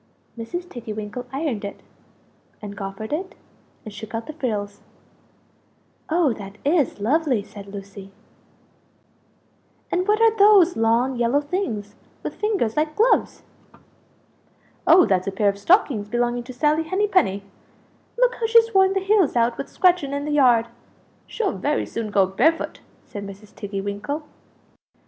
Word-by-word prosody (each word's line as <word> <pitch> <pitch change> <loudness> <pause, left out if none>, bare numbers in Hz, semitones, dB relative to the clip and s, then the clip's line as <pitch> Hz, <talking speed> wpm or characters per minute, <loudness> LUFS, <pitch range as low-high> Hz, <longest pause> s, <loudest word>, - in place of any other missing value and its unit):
Mrs. 345 +11 -6
Tiggy 235 -7 -7
winkle 215 +4 -6
ironed 270 -6 -3
it, 200 - -7 0.8
and 205 -1 -8
goffered 195 +4 -6
it, 375 +6 -4 0.5
and 215 - -8
shook 220 +2 -8
out 225 - -4
the 310 - -7
frills. 210 -8 -3 1.3
"Oh 320 -5 +2
that 200 -1 -10
is 290 -6 +1
lovely!" 260 0 +1
said 200 -1 -12
Lucie. 195 -1 -10 1.8
"And 365 +2 0
what 425 +1 +3
are 450 -1 +4
those 400 -4 +6
long 235 +3 +1
yellow 240 +4 +2
things 285 - -3 0.3
with - - -4
fingers 400 - -1
like 305 0 0
gloves?" 465 +3 +2 1.4
"Oh, 365 - +7
that's 185 -2 0
a - - 0
pair 200 +1 +2
of 200 0 -4
stockings 265 - +2
belonging 240 +1 -1
to 255 - -8
Sally 300 +5 +2
Henny 380 +6 0
penny 205 - +1 0.7
look - - +3
how 455 - 0
she's 455 0 +4
worn 385 0 +4
the 390 - 0
heels 390 -7 +2
out 235 0 +2
with 275 - -6
scratching 355 -7 +2
in 285 0 -3
the 300 - -3
yard! 250 -6 +4 0.6
She'll 415 -5 -1
very 295 - -1
soon 230 -2 -5
go 200 -2 +3
barefoot!" 315 - 0 0.3
said 205 - -8
Mrs. 200 +1 -11
Tiggy 200 -2 -5
winkle. 205 +10 -4
250 Hz, 150 wpm, -23 LUFS, -, 1.8 s, Oh